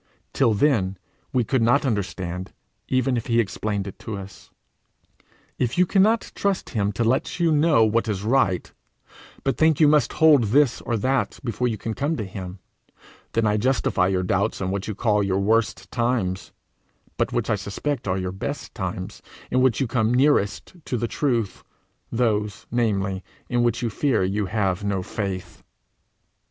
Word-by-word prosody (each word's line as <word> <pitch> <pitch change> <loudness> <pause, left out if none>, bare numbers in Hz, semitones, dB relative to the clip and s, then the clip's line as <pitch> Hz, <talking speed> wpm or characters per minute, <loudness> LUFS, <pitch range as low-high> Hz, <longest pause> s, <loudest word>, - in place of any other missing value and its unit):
Till 110 - +3
then 100 -7 +2 0.3
we 125 -2 +2
could 130 +2 0
not 120 +6 +3
understand 95 -5 -3 0.3
even 130 -1 +1
if 115 - -4
he 115 0 +2
explained 100 -2 -2
to 110 -2 -5
us. 95 0 -11 1.1
If 120 +3 0
you 180 - +5
cannot 210 +5 +2
trust 200 -2 -1
him 105 -4 0
to 115 - 0
let 125 +9 0
you 170 -2 +3
know 150 -6 +4
what 115 +2 +1
is 100 -2 -2
right, 110 -6 +1 0.7
but 135 - 0
think 160 -2 +4
you 155 - +6
must 150 -4 +3
hold 150 -7 +5
this 135 +4 +3
or 115 - -1
that 130 +5 0
before 125 0 -1
you 115 -3 -2
can 110 +2 -4
come 145 +7 -1
to 110 - -2
him, 95 -1 -7 0.8
then 115 -1 +2
I 105 0 +2
justify 115 -6 +1
your 95 -1 0
doubts 100 +4 0
in 95 -1 -2
what 100 0 -3
you 110 - -3
call 105 -1 +2
your 95 -1 0
worst 100 -2 0
times, 115 -7 -1 0.6
but - - 0
which - - -1
I - - +3
suspect 105 +6 -3
are 95 0 0
your 90 -1 -2
best 95 - -5
times - - -5 0.3
in 130 - +3
which 130 -4 +3
you 135 - +2
come 115 -2 +1
nearest 130 -6 +2
to 125 - -2
the 120 - -1
truth 115 -7 -1 0.5
those, 105 -4 0
namely, 100 -5 0 0.3
in 120 0 +1
which 120 +1 +1
you 115 - -1
fear 135 -2 +1
you 100 +2 -1
have 95 -2 -1
no 100 -2 -1
faith. 95 -3 -5
110 Hz, 170 wpm, -24 LUFS, 100-130 Hz, 1.1 s, you